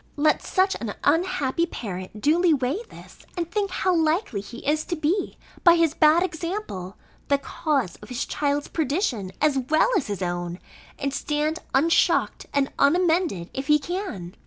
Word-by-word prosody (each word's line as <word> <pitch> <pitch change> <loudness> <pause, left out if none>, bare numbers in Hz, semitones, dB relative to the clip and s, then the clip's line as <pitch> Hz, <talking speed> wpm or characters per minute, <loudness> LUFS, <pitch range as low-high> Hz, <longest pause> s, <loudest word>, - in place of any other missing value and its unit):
Let 300 +1 +2
such 380 0 +1
an 220 -3 -4
unhappy 335 -1 +1
parent 195 - -6
duly 325 - +4
weigh 270 - -1
this, - - -14 0.2
and 340 -1 -3
think 405 0 0
how 370 0 0
likely 320 - +1
he 235 +4 -11
is 305 +1 +2
to 345 - -2
be, 330 +5 -1 0.3
by 345 -1 +8
his 330 -3 +2
bad 315 +2 +5
example, 335 - -4 0.3
the 280 - +3
cause 275 - -2
of - - -14
his 250 +1 -2
child's 290 0 -1
perdition, 280 - -1
as 290 -3 +3
well 310 - +2
as 345 - +1
his 200 -2 -3
own, 175 0 -3 0.4
and 275 -1 -2
stand 300 +3 -1 0.2
unshocked 325 +5 +2
and 280 -1 +1
unamended, 325 - +2
if 265 +1 -4
he 300 0 +6
can! 295 - -5
300 Hz, 160 wpm, -24 LUFS, 250-340 Hz, 0.4 s, by